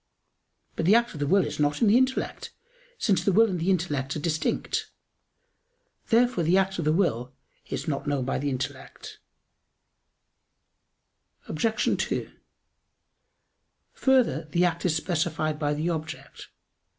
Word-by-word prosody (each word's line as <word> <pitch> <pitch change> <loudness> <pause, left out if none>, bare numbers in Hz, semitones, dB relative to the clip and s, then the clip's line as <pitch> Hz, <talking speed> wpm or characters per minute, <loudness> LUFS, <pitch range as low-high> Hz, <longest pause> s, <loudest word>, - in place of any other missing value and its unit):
But 165 - -1
the 205 - +6
act 235 0 +2
of 150 - -8
the 145 - -1
will 190 +2 +4
is 150 - -6
not 145 0 +1
in 230 - +3
the 205 - +5
intellect; 260 +1 0 0.5
since 200 -4 +1
the 200 - +2
will 225 +4 +5
and 180 - -2
the 170 +4 0
intellect 150 -8 -1
are - - -3
distinct. 155 0 -1 1.2
Therefore 240 -5 +3
the 170 +4 +3
act 195 -1 0
of 165 - -2
the 155 - +3
will 130 - 0 0.3
is - - -5
not 140 -2 -2
known 140 -3 0
by 135 - -1
the 145 +2 -1
intellect. 130 -1 -6 2.3
Obj. 215 +7 0
2: - - -3 1.6
Further, 245 - +2
the 175 +2 +2
act 170 -1 -1
is 160 - +1
specified 160 -2 -1
by 145 -1 0
the 160 +4 -1
object. 160 -1 -7
165 Hz, 145 wpm, -26 LUFS, 150-195 Hz, 2.3 s, the